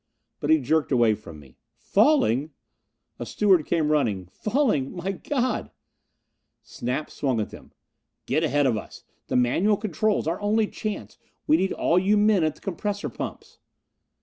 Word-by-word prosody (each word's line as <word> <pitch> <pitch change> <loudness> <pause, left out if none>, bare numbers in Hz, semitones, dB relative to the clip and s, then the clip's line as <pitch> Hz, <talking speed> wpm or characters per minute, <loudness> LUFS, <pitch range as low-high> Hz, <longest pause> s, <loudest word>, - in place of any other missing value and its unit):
But 145 - -3
he 160 - +6
jerked 150 +3 0
away 120 -4 +4
from 85 -7 -10
me. 70 -3 -18 0.2
"Falling?" 195 - +2 0.7
A - - -4
steward 190 -6 +3
came 155 -3 +1
running. 105 - 0
"Falling? 215 - 0
My 180 +2 -3
God!" 255 +5 -2 0.9
Snap 125 +5 -4
swung 130 -5 -1
at 105 - -3
them. - - -13 0.5
"Get 155 +5 0
ahead 145 -2 +2
of 120 -5 +2
us! - - -9 0.2
The - - -2
manual 170 - +3
controls 215 +1 0
our 165 +5 -2
only 215 +2 +2
chance 215 0 -6 0.3
we 310 - +4
need 190 - 0
all 175 - +2
you 200 +3 +2
men 205 -4 +4
at 155 -1 0
the - - -21
compressor 200 +2 -3
pumps!" - - -8
165 Hz, 155 wpm, -25 LUFS, 130-210 Hz, 0.9 s, he